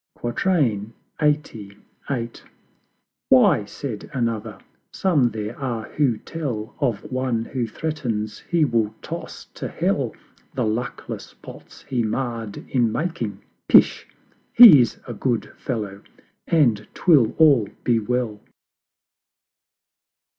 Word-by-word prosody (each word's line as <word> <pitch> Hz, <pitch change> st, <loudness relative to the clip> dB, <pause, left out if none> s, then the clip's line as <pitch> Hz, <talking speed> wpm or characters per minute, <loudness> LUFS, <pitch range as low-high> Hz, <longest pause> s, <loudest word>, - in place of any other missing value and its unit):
LXXXVIII. 120 Hz, -, -1 dB, 1.6 s
"Why," 125 Hz, -4 st, +5 dB
said 110 Hz, +1 st, -7 dB
another, 115 Hz, -3 st, -2 dB, 0.3 s
"Some 150 Hz, -10 st, +2 dB
there 110 Hz, 0 st, -5 dB
are 120 Hz, -5 st, -4 dB
who 135 Hz, -7 st, +1 dB
tell 120 Hz, -6 st, -5 dB
Of 120 Hz, -8 st, -1 dB
one 130 Hz, -3 st, -1 dB
who 125 Hz, -3 st, -3 dB
threatens 115 Hz, -6 st, -3 dB
he 170 Hz, -3 st, +1 dB
will 115 Hz, -4 st, 0 dB
toss -, -, -7 dB
to -, -, -5 dB
Hell -, -, -1 dB, 0.4 s
The -, -, 0 dB
luckless 120 Hz, +3 st, -4 dB
Pots -, -, -13 dB
he 125 Hz, -2 st, -1 dB
marr'd 115 Hz, -2 st, -4 dB
in 120 Hz, -4 st, +1 dB
making 150 Hz, -, -3 dB, 0.2 s
Pish! -, -, +5 dB, 0.5 s
He's 160 Hz, -, +9 dB
a 120 Hz, -, -5 dB
Good 120 Hz, +1 st, -2 dB
Fellow, 105 Hz, -5 st, -5 dB, 0.5 s
and 120 Hz, -11 st, +2 dB
'twill 145 Hz, -, +4 dB
all 140 Hz, -10 st, +5 dB
be 120 Hz, -2 st, +2 dB
well." 115 Hz, -1 st, -2 dB
120 Hz, 105 wpm, -22 LUFS, 110-140 Hz, 1.6 s, He's